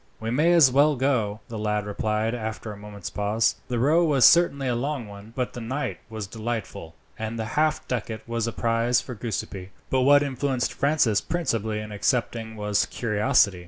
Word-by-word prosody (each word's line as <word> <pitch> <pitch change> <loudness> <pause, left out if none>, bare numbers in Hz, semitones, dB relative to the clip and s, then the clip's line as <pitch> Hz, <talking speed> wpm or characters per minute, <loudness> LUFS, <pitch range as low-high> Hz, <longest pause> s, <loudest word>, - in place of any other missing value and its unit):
"We 110 +1 -3
may 155 +7 +3
as 155 -7 +6
well 145 +3 +4
go," 120 -6 0
the 115 -2 -6
lad 105 -1 -1
replied 110 +2 -1
after 110 -2 -5
a - - -8
moment's 100 -1 -8
pause. 105 +2 +1
The 125 - -2
row 150 +8 +3
was 140 -6 +4
certainly 140 -6 +5
a 125 - +1
long 135 +1 -2
one, 100 +1 -11
but 125 -2 -2
the 120 - -6
night 130 +6 -3
was 110 -2 -5
delightful, 110 -5 -5 0.2
and 110 +1 -4
the 110 - -2
half 155 0 +1
ducat 115 -2 -4
was 115 -1 -1
a - - -1
prize 115 +2 +1
for 125 - -7
Giuseppi; 100 -4 -5 0.2
but 130 - +3
what 145 +2 +6
influenced 135 -2 -1
Francis 140 -7 +2
principally 115 - -1
in 105 0 -7
accepting 115 +1 -1
was 105 -1 0
curiosity. 105 -4 +2
115 Hz, 185 wpm, -25 LUFS, 105-135 Hz, 0.2 s, as